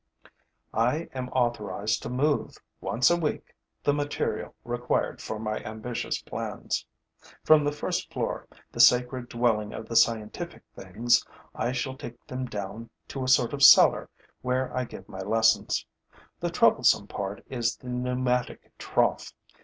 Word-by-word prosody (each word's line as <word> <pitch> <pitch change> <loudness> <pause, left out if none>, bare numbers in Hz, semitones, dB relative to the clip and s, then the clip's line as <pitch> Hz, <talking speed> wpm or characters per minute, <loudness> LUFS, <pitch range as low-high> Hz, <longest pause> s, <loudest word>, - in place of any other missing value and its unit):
I 125 +9 +1
am 130 -1 -4
authorized 110 -4 -1
to - - -5
move, 140 +4 0 0.2
once 125 +7 +2
a - - +5
week, 160 -4 -3 0.3
the 145 - +3
material 145 0 -2
required - - -1
for 110 - -4
my 110 0 -3
ambitious 110 +2 -4
plans. - - -4 0.6
From 155 -1 +6
the 145 - +1
first 150 - -3
floor, - - -3 0.2
the - - -9
sacred 125 0 +4
dwelling 115 -3 0
of 110 - -7
the 115 - -5
scientific 110 -2 +1
things, 110 +6 +1 0.3
I 120 - -1
shall 130 +1 -3
take 120 - -10
them 130 0 -4
down 105 +1 -6 0.2
to 135 - -4
a - - -3
sort 130 0 +4
of 140 - -4
cellar - - +7 0.3
where 125 +1 -1
I 130 0 0
give 95 -4 -11
my 95 - -7
lessons. 110 +3 +2 0.5
The - - -1
troublesome - - +4
part 100 0 -5
is 120 -2 -1
the 125 - -10
pneumatic 125 0 -1
trough. - - 0
125 Hz, 145 wpm, -27 LUFS, 110-130 Hz, 0.6 s, cellar